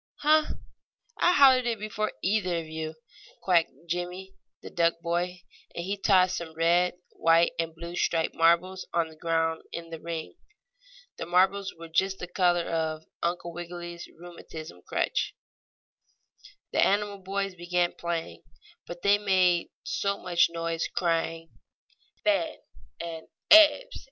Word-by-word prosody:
"Huh! 305 +1 +3 0.6
I 355 - +4
hollered 260 -5 +6
it 230 -1 0
before 215 0 -3
either 185 -3 +1
of 165 - -4
you," 160 0 -5 0.4
quacked 175 -3 +3 0.2
Jimmie, 180 +3 -4 0.3
the - - -9
duck 170 -1 +1
boy, 175 +1 -2 0.3
and 170 - -4
he 200 +2 -1
tossed 185 -2 +3
some 160 -2 -7
red, 175 +2 +2 0.2
white 165 +1 +3
and 165 -1 -2
blue 170 +1 -7
striped 165 -2 0
marbles 170 +3 +2
on 165 -1 +1
the 160 - -15
ground 165 0 0
in 165 0 -7
the 165 - -6
ring. 165 - -6 0.8
The - - -5
marbles 190 +2 +2
were 165 0 -9
just 190 +4 0
the - - -5
color 175 -1 +2
of 160 -1 -2 0.2
Uncle 170 0 -2
Wiggily's 175 0 -7
rheumatism 160 - -10
crutch. - - -1 1.4
The - - +3
animal 205 0 +1
boys 195 +1 -3
began 175 0 0
playing, 165 - -4 0.5
but 175 0 -9
they 200 +1 +4
made 185 -4 +2
so 200 0 -1
much 175 -2 +2
noise, 165 -1 -2
crying 165 -1 -1 0.7
"Fen!" 315 0 +1 0.4
and 165 -1 -6 0.2
"Ebbs!" 320 +11 +7
175 Hz, 135 wpm, -27 LUFS, 165-190 Hz, 1.4 s, Ebbs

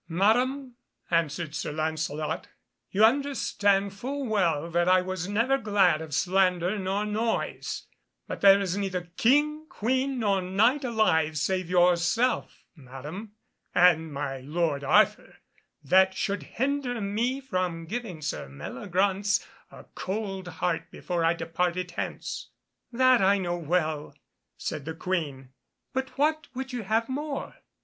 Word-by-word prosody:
"Madam," 245 +8 +1 0.4
answered 165 -1 0
Sir 150 - -3
Lancelot, 155 +1 -2 0.4
"you 210 +3 +5
understand 210 -7 +1
full 270 +7 -4
well 170 -9 +1
that 175 +1 +2
I 185 0 +6
was 185 -1 -3
never 235 +6 +2
glad 195 -8 +3
of 160 -1 -8
slander 185 +3 +2
nor 195 +2 -1
noise, 220 +2 -2 0.4
but - - -6
there 195 0 +8
is 190 -2 -1
neither 185 -3 -3
King, 300 +5 +2
Queen, 260 +4 0
nor 200 -5 +1
Knight 220 +10 +2
alive, 170 - +2
save 185 +3 -1
yourself, 180 +7 +2
Madam, 150 - -9 0.4
and 160 -3 +5
my 140 -1 -3
lord 150 +1 -1
Arthur, 140 - +3 0.5
that 190 +5 +4
should 200 +1 -1 0.2
hinder 265 -1 0
me 225 +6 -1
from 185 -10 -2
giving 190 -5 -5
Sir 145 - -4
Meliagraunce 190 - -1 0.2
a - - -13
cold 195 -2 -4
heart 175 -1 -2
before 175 -2 -3
I 165 +1 +3
departed 180 +2 -2
hence." - - -5 0.4
"That 255 -1 +4
I 195 +1 +4
know 175 -2 -2
well," 155 -2 -1 0.4
said 150 -3 -4
the 160 0 -5
Queen, 155 -8 -3 0.4
"but 265 +1 -3
what 310 +2 +1
would 265 0 -5
you 245 - -2
have 225 +3 +1
more? 285 +2 -4
190 Hz, 130 wpm, -27 LUFS, 165-230 Hz, 0.5 s, there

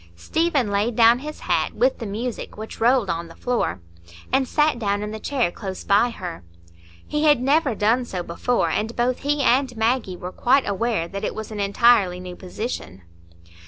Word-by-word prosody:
Stephen 285 - 0
laid 210 +4 0
down 230 +1 +6
his 300 +3 -8
hat, - - 0
with - - +2
the - - -5
music, 225 +4 -5
which 220 +1 -8
rolled 240 -2 +3
on 170 -1 -3
the 165 - -14
floor, 240 - -1 0.5
and 265 0 +3
sat 295 -3 +2
down 205 -2 -1
in 210 - -4
the 220 - -6
chair 250 -7 0
close 190 -1 -7
by 205 +4 +3
her. 180 - -7 0.6
He 300 +1 -1
had 295 -4 +5
never 275 -1 +2
done 230 +5 +2
so 185 -6 -4
before, 235 +9 0
and 220 +2 -2
both 245 +1 0
he 290 0 0
and 255 -1 +2
Maggie 225 -4 0
were 180 +1 -6
quite 265 +7 +2
aware 200 -3 -1
that 195 +2 -6
it - - -2
was 220 0 -6
an 210 - -5
entirely 200 -2 +3
new 180 -1 -8
position. 180 - -6
230 Hz, 190 wpm, -23 LUFS, 200-255 Hz, 0.6 s, down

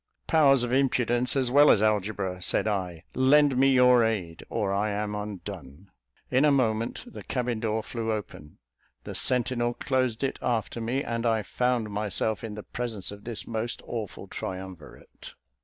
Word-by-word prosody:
"Powers 140 -5 +4
of 120 0 -2
Impudence, 125 -2 +2
as 130 -3 +1
well 145 +2 +7
as - - +6
Algebra," 100 -3 0
said 90 - 0
I, 90 -5 -2
"lend 140 +2 +4
me 135 +2 +4
your 125 -2 +6
aid, 95 -8 -2
or 105 -4 -1
I 105 +2 0
am 105 0 -2
undone." 100 -5 -7 0.4
In 130 +3 +3
a 150 - +5
moment 115 -4 0
the 245 - -10
cabin 125 -3 -2
door 110 0 -1
flew 115 -1 -3
open, 95 -8 -6 0.5
the - - -7
sentinel 120 -1 0
closed 130 -3 -1
it 135 - -2
after 115 0 -1
me, 125 +5 -1
and 115 0 -3
I 115 -2 +1
found 125 -3 -1
myself 105 +1 -1
in 110 -2 -5
the 105 - -7
presence 115 -6 -4
of 100 0 -11
this 115 -2 -6
most 115 +1 -3
awful 110 -5 -5
triumvirate. 95 -3 -8
115 Hz, 165 wpm, -27 LUFS, 105-125 Hz, 0.5 s, well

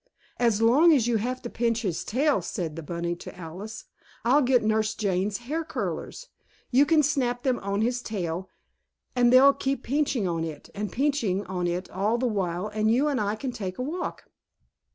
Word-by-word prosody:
"As 225 -2 +2
long 285 +9 +6
as 260 -7 +3
you 240 -1 +2
have 250 +4 -3
to 240 - -4
pinch 230 0 0
his 180 -6 -2
tail," 280 +6 +1
said 165 -6 -4
the 165 - -5
bunny 170 +2 -3
to - - -10
Alice, 185 +6 -8 0.4
"I'll 270 +5 +5
get 250 -3 +3
Nurse 220 0 +1
Jane's 195 0 0
hair 315 +6 -2
curlers. - - -5 0.4
You 275 +3 +5
can 315 -2 +4
snap 250 -4 0
them 255 -3 +1
on 200 +1 -2
his 245 +1 0
tail 185 -5 -4 0.7
and 245 -1 +4
they'll 270 +2 +8
keep 270 -2 -2
pinching 270 -6 0
on 165 -2 -1
it, 155 -3 -7
and 205 -1 -4
pinching 240 -9 0
on 180 -1 -2
it 175 +2 -2
all 205 +5 0
the 255 - -1
while, 190 -4 -1
and 215 +1 0
you 255 +6 +3
and 275 -5 0
I 205 +1 0
can 250 +4 -4
go - - -9
take 185 -3 -4
a 250 - -2
walk." 335 +7 -4
225 Hz, 195 wpm, -26 LUFS, 190-260 Hz, 0.7 s, they'll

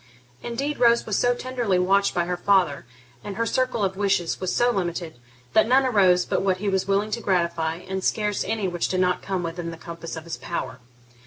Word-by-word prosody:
Indeed 275 +5 -3
Rose 235 -1 +4
was 210 -3 0
so 245 0 +2
tenderly 245 -6 -1
watched 195 +2 +2
by 175 - +1
her 180 +1 -2
father, 175 -9 +1 0.4
and 205 -1 -6
her 230 - 0
circle 255 -2 0
of 190 -1 0
wishes 190 -4 0
was 185 - -1
so 240 0 +3
limited, 175 - -3 0.3
that 220 - +5
none 265 +2 +4
arose 185 -7 +4
but - - 0
what 190 -1 +1
he 205 +2 -4
was 190 -1 0
willing 200 +2 +1
to 230 - -2
gratify, 170 -5 0
and 190 0 -3
scarce 210 -2 0
any 220 -3 -1
which 175 -1 -1
did 185 - -1
not 180 -1 +1
come 190 -2 -3
within 170 0 -4
the 165 - -8
compass 170 0 -8
of 160 - -7
his 170 -5 -6
power. 130 0 -5
190 Hz, 215 wpm, -24 LUFS, 175-220 Hz, 0.4 s, that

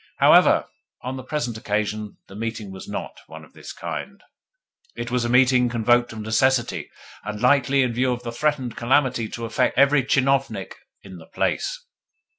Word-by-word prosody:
However, - - +5 0.4
on 130 +1 -4
the 130 - -6
present 125 -4 -3
occasion, 105 0 -3
the 95 - -13
meeting 110 -2 -5
was 95 0 -10
NOT - - -6
one - - -11
of - - -24
this - - -10
kind; 200 +1 -7 0.7
it 120 0 -5
was 125 -1 0
a - - -1
meeting 125 0 +4
convoked 120 +1 +2
of 110 -1 -7
necessity, 120 +3 0 0.3
and 105 0 -5
likely 140 +1 +3
in 125 -2 -1
view 125 +2 +1
of 120 0 -4
the 120 - -4
threatened 130 -2 -1
calamity 125 -2 +1
to 115 - -6
affect 115 - 0
every 140 +1 +5
tchinovnik 135 -6 0 0.3
in 95 -2 -11
the 80 -1 -14
place. - - -2
120 Hz, 170 wpm, -23 LUFS, 110-130 Hz, 0.7 s, However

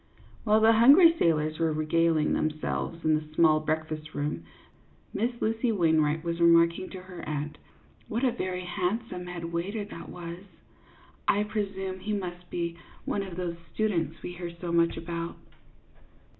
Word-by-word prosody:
While 215 0 +4
the 220 +1 +7
hungry 290 +10 +8
sailors 155 -1 +1
were 165 -1 +2
regaling 155 0 +2
themselves 155 +2 -2
in 155 - +4
the 155 0 -2
small 155 -2 +5
breakfast 155 0 -3
room, 145 - -3 0.7
Miss 235 +3 -1
Lucy 225 +2 +1
Wainwright 160 -5 +2
was 170 0 -2
remarking 170 +2 +4
to 185 - -8
her 180 -1 -10
aunt, 150 0 -4 0.2
" - - -31
What 230 +4 -2
a 255 - +4
very 185 -5 -3
handsome 180 +1 -2
head 170 -1 -6
waiter 200 +5 -2
that 170 -5 -9
was! 170 0 -7 0.9
I 205 - +3
presume 195 -3 -3
he 210 +3 -3
must 180 -3 -5
be 170 -1 -3 0.3
one 200 - -1
of 190 -3 -6
those 175 -2 -3 0.2
students 205 -7 -1
we - - -4
hear 175 -1 -5
so 175 -1 -4
much 170 0 +2
about." 170 0 -5
175 Hz, 155 wpm, -28 LUFS, 160-200 Hz, 0.9 s, hungry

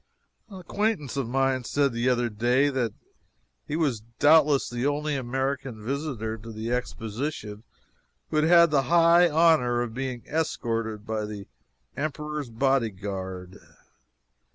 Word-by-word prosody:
An 195 -3 -9
acquaintance 190 - -2
of 135 -4 -2
mine 135 0 +1
said 140 +1 +1
the 120 +2 +1
other 120 -1 +1
day 120 +6 +2
that 130 -5 -1 0.8
he 150 - -3
was 140 -9 0 0.2
doubtless 150 -2 +5
the 120 0 -4
only 150 +1 -1
American 130 -3 -3
visitor 130 -5 -3
to 115 +2 -9
the 110 +2 -5
Exposition 115 -2 -4 0.7
who 155 - 0
had 155 - +3
had 170 -1 +6
the 140 -2 +4
high 170 +1 +6
honor 155 -7 +3
of 115 -2 -6
being 125 -1 -4
escorted 115 -8 -2
by 110 -1 -2
the 105 -1 -7 0.5
Emperor's 150 -1 -4
bodyguard. 100 -7 -2
130 Hz, 130 wpm, -26 LUFS, 115-150 Hz, 0.8 s, had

